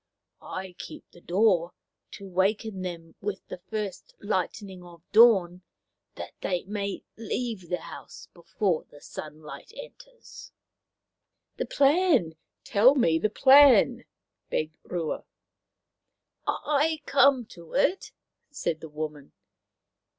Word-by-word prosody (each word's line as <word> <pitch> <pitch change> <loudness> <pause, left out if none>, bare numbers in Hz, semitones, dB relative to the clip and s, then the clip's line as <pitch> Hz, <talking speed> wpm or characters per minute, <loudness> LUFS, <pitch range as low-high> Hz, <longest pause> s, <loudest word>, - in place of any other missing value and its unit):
I 185 0 -6
keep - - -9
the 175 - -17
door, 180 -2 +2 0.4
to 200 - -9
waken 195 +2 0
them 170 -3 -6
with 200 -1 -4
the - - -7
first 210 -4 -5
lightening 190 -1 -3
of 170 -2 -15
dawn, 195 -6 +5 0.5
that - - -8
they 180 -2 -1
may 200 0 -4
leave 220 -4 -4
the 180 - -2
house - - -11
before 170 0 -1
the 145 - -17
sunlight 150 - -10
enters/' - - -13 0.5
" - - -55
The - - -2
plan! 285 - +3 0.3
Tell 240 +7 +5
me 165 - +3
the 215 - +1
plan," 275 +3 +6 0.4
begged 155 0 -3
Rua. 170 -3 -4 0.7
" - - -50
I 305 +1 0
come 275 -3 +4
to 170 -2 -14
it," 365 +6 +1 0.4
said 170 - -3
the 160 - -9
woman. 150 -2 -6
195 Hz, 120 wpm, -27 LUFS, 170-240 Hz, 0.7 s, plan